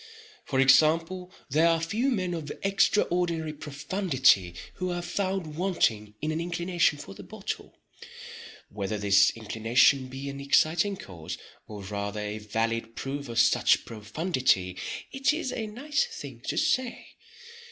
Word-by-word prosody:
For 130 Hz, -, -1 dB
example, 165 Hz, +6 st, +4 dB, 0.2 s
there 160 Hz, +4 st, +4 dB
are 165 Hz, -1 st, +3 dB
few 215 Hz, +11 st, 0 dB
men 185 Hz, -8 st, -1 dB
of 155 Hz, -4 st, -5 dB
extraordinary 175 Hz, -5 st, +1 dB
profundity 140 Hz, -, +1 dB, 0.2 s
who 185 Hz, -1 st, -2 dB
are 175 Hz, 0 st, -2 dB
found 185 Hz, -3 st, -2 dB
wanting 115 Hz, -, 0 dB
in 155 Hz, -, 0 dB
an 160 Hz, +1 st, -2 dB
inclination 175 Hz, -2 st, +1 dB
for 95 Hz, -, -9 dB
the -, -, -11 dB
bottle. -, -, -7 dB, 0.9 s
Whether 105 Hz, +1 st, -3 dB
this 100 Hz, 0 st, +5 dB
inclination 115 Hz, +4 st, +2 dB
be 135 Hz, +2 st, -7 dB
an 140 Hz, 0 st, -5 dB
exciting 160 Hz, +8 st, +2 dB
cause, 85 Hz, -, -8 dB, 0.3 s
or 105 Hz, -2 st, -8 dB
rather 100 Hz, +1 st, -4 dB
a 105 Hz, +1 st, -4 dB
valid 115 Hz, +2 st, -2 dB
proof 140 Hz, 0 st, -5 dB
of 115 Hz, -, -5 dB
such 115 Hz, -, +4 dB
profundity, 110 Hz, -, 0 dB, 0.4 s
it 270 Hz, +1 st, +2 dB
is 285 Hz, -5 st, -3 dB
a 220 Hz, -2 st, -3 dB
nice 285 Hz, -, -1 dB
thing 460 Hz, -2 st, -9 dB
to -, -, -1 dB
say. 255 Hz, -2 st, 0 dB
150 Hz, 140 wpm, -28 LUFS, 110-180 Hz, 0.9 s, this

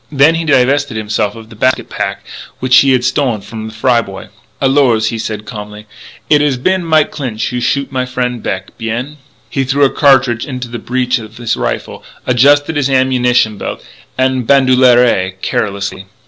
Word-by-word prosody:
Then 145 Hz, +2 st, +4 dB
he 165 Hz, 0 st, -2 dB
divested 140 Hz, -3 st, +2 dB
himself 105 Hz, -1 st, -2 dB
of 115 Hz, 0 st, -12 dB
the -, -, -11 dB
basket 130 Hz, +4 st, 0 dB
pack -, -, -4 dB, 0.3 s
which 130 Hz, 0 st, +4 dB
he 135 Hz, -, +5 dB
had 125 Hz, -1 st, +1 dB
stolen 130 Hz, -5 st, 0 dB
from 110 Hz, +2 st, -8 dB
the 110 Hz, -, -9 dB
Fry 120 Hz, +1 st, +2 dB
boy. 95 Hz, -3 st, -10 dB, 0.3 s
"Alors," 130 Hz, -5 st, +2 dB
he 115 Hz, -1 st, -4 dB
said 110 Hz, -1 st, -5 dB
calmly, 105 Hz, -2 st, -9 dB, 0.4 s
"it 150 Hz, -1 st, +4 dB
has 145 Hz, -3 st, +1 dB
been 185 Hz, +8 st, 0 dB
Mike 155 Hz, -2 st, +2 dB
Clinch 125 Hz, -7 st, -3 dB
who 125 Hz, -, -3 dB
shoot 135 Hz, +4 st, -1 dB
my 130 Hz, -1 st, -2 dB
frien' 125 Hz, -1 st, -2 dB
Beck. 95 Hz, -3 st, -5 dB
Bien." 120 Hz, +6 st, -4 dB, 0.3 s
He 135 Hz, -, -1 dB
threw 140 Hz, +2 st, +2 dB
a 135 Hz, -, +1 dB
cartridge 130 Hz, -5 st, +3 dB
into 125 Hz, -3 st, -5 dB
the 120 Hz, 0 st, -6 dB
breech 125 Hz, +2 st, -1 dB
of 110 Hz, 0 st, -11 dB
his 120 Hz, -2 st, -1 dB
rifle, -, -, -4 dB, 0.2 s
adjusted 145 Hz, +5 st, +3 dB
his 140 Hz, -2 st, +1 dB
ammunition 125 Hz, -5 st, +2 dB
belt -, -, -6 dB, 0.3 s
en 130 Hz, -1 st, +1 dB
bandoulière, 125 Hz, -8 st, +3 dB
carelessly. 100 Hz, -1 st, -3 dB
125 Hz, 175 wpm, -14 LUFS, 110-135 Hz, 0.4 s, he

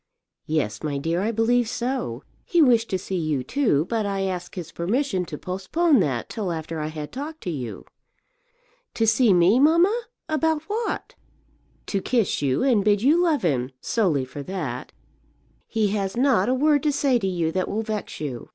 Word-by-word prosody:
"Yes, 150 Hz, -9 st, -1 dB
my 150 Hz, -3 st, -2 dB
dear, 165 Hz, +5 st, -1 dB
I 215 Hz, +3 st, 0 dB
believe 230 Hz, +1 st, +2 dB
so. 245 Hz, -, -3 dB, 0.2 s
He 360 Hz, -8 st, +1 dB
wished 240 Hz, -6 st, +4 dB
to 190 Hz, -, 0 dB
see 185 Hz, 0 st, -3 dB
you, 155 Hz, -5 st, -1 dB
too; 210 Hz, -, +1 dB
but 225 Hz, +2 st, -1 dB
I 200 Hz, -1 st, -2 dB
asked 180 Hz, -2 st, -3 dB
his 170 Hz, -3 st, -6 dB
permission 190 Hz, +1 st, -1 dB
to 150 Hz, -, -7 dB
postpone 255 Hz, -, +1 dB
that 130 Hz, -10 st, 0 dB
till 200 Hz, -5 st, -3 dB
after 160 Hz, 0 st, -4 dB
I 150 Hz, -, -2 dB
had 155 Hz, -1 st, -6 dB
talked 305 Hz, +5 st, -6 dB
to 180 Hz, -, -3 dB
you." 125 Hz, -7 st, -6 dB, 1.1 s
"To 225 Hz, -, +2 dB
see 225 Hz, +1 st, +4 dB
me, 180 Hz, +6 st, +5 dB
mamma? 350 Hz, -, +4 dB, 0.2 s
About 315 Hz, 0 st, 0 dB
what?" 440 Hz, +5 st, -3 dB, 0.7 s
"To 195 Hz, -, -2 dB
kiss 230 Hz, -3 st, 0 dB
you, 135 Hz, -2 st, +1 dB
and 240 Hz, -7 st, +3 dB
bid 205 Hz, 0 st, +2 dB
you 310 Hz, +6 st, +5 dB
love 325 Hz, -, +2 dB
him; 130 Hz, -7 st, +1 dB
solely 165 Hz, -, +1 dB
for 135 Hz, +3 st, -8 dB
that. 145 Hz, -7 st, -5 dB, 0.8 s
He 215 Hz, -2 st, +1 dB
has 195 Hz, 0 st, -2 dB
not 245 Hz, -5 st, +3 dB
a -, -, +3 dB
word 290 Hz, +1 st, +3 dB
to 300 Hz, -, +2 dB
say 275 Hz, -3 st, +2 dB
to 195 Hz, -, -1 dB
you 170 Hz, -3 st, 0 dB
that 185 Hz, +2 st, -1 dB
will 220 Hz, +2 st, -1 dB
vex 215 Hz, -2 st, -4 dB
you." 135 Hz, -6 st, -5 dB
200 Hz, 185 wpm, -24 LUFS, 165-260 Hz, 1.1 s, me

